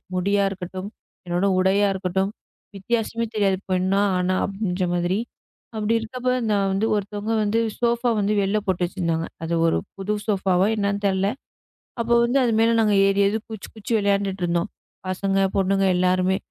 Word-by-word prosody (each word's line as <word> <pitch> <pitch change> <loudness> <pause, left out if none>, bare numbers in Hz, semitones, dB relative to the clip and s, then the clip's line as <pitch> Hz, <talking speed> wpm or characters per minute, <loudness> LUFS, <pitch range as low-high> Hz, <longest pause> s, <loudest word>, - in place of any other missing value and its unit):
முடியா 200 +2 +2
இருக்கட்டும், 185 +1 -6 0.4
என்னோட 175 +2 0
உடையா 195 +2 +3
இருக்கட்டும் 190 +1 -1 0.5
வித்தியாசமே 230 +3 -1
தெரியாது. 195 -3 +2
பொண்ணா 185 +2 +2 0.2
ஆணா 180 +1 +1
அப்படிங்கற 195 -2 -2
மாதிரி 175 +2 0 0.6
அப்படி 215 +1 0
இருக்கிறப்ப 250 +3 -3 0.2
நான் 200 -1 +2
வந்து 195 +3 0
ஒருத்தவங்க 205 +2 -3
வந்து 210 +2 +1 0.2
சோபா 235 0 +1
வந்து 205 +1 +1
வெளில 195 +2 +1
போட்டு 185 -3 0
வச்சிருந்தாங்க. 170 -3 -2 0.2
அது 165 +1 -2
ஒரு 165 - +2 0.2
புது 195 +2 -2
சோபா 195 -2 0
வா - - +5
என்னன்னு 200 -1 -1
தெரியல. 195 0 +2 0.7
அப்போ 235 +1 +1
வந்து 240 +3 +2
அது 240 - +2
மேல 225 +1 +4
நாங்க 215 -2 +3
ஏறி 195 0 +2
ஏறி 205 +2 +1
குதித்து 220 -3 -8
குதித்து 220 +1 -5
விளையாடிட்டு 200 -2 0
இருந்தோம். 170 +3 0 0.4
பசங்க, 195 +1 -1 0.2
பொண்ணுங்க 195 0 +2
எல்லாருமே. 185 +1 +2
195 Hz, 155 wpm, -23 LUFS, 185-210 Hz, 0.7 s, வா